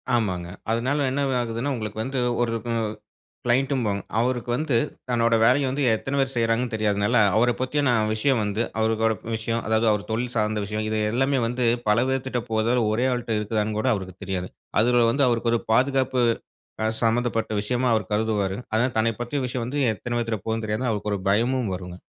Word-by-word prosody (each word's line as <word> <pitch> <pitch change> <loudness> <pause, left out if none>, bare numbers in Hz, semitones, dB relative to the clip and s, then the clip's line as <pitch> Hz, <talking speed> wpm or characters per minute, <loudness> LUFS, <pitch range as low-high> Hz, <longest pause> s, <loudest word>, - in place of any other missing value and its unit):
ஆமாங்க. 90 -7 -1 0.2
அதனால 135 +5 +1
என்ன 140 +1 0
இது 130 - 0
ஆகுதுன்னா, 120 +4 -2
உங்களுக்கு 110 -2 -4
வந்து 130 +1 -2 0.2
ஒரு 115 -1 0
க - - -3 0.8
க்ளைண்ட்ம்போம். 125 -4 +1 0.2
அவருக்கு 120 0 0
வந்து 140 -1 0 0.3
தன்னோட 115 -1 +2
வேலைய 130 +4 +4
வந்து 140 +2 -1
எத்தனை 135 +5 -4
பேர் 135 0 0
செய்கிறாங்கன்னு 115 +1 +1
தெரியாதனால, 105 -1 +1 0.2
அவர 120 +2 +4
பத்தியான 130 0 +1 0.2
விஷயம் 125 +1 +1
வந்து 105 +2 -1 0.2
அவரோட 110 0 +2 0.2
விஷயம் 115 +1 -2
அதாவது 110 +1 +2
அவர் 105 0 -3
தொழில் 120 +2 -2
சார்ந்த 105 -1 0
விஷயம், 105 +1 -3
இது 110 0 -1
எல்லாமே 135 +2 +2
வந்து 125 +1 -1 0.2
பல 105 +3 +4
பேர்க்கிட்ட 130 -2 -1
போதா? 110 +2 +1 0.2
ஒரே 120 +4 +1
ஆள்ட்ட 120 -2 -2
இருக்குதான்னு 105 0 -1
கூட 110 - +1
அவருக்கு 95 -3 -6
தெரியாதுங்க. 95 -1 -4 0.3
அதில 120 0 +4
வந்து 140 +3 +2
அவருக்கு 115 -1 +1
ஒரு 115 - +1
பாதுகாப்பு 130 +1 +2 0.6
அ - - +1 0.2
சம்மந்தப்பட்ட 115 0 +1
விஷயமா 125 +3 0
அவர் 105 -3 -2
கருதுவாரு. 105 -3 0 0.2
அதனால 120 +3 +2
தன்னைப் 115 +1 +1
பற்றிய 120 +4 -2
விஷயம் 120 -1 -3
வந்து 140 +4 -3 0.2
எத்தன 120 +4 -4
பேத்துட்ட 115 -3 -2
போகுதுன்னு 110 0 -2
தெரியாம, 110 +4 -1
அவருக்கு 105 0 -2
ஒரு - - -2
பயமும் 120 0 +1
வரும்ங்க. 90 0 -8
115 Hz, 175 wpm, -24 LUFS, 110-125 Hz, 0.8 s, வேலைய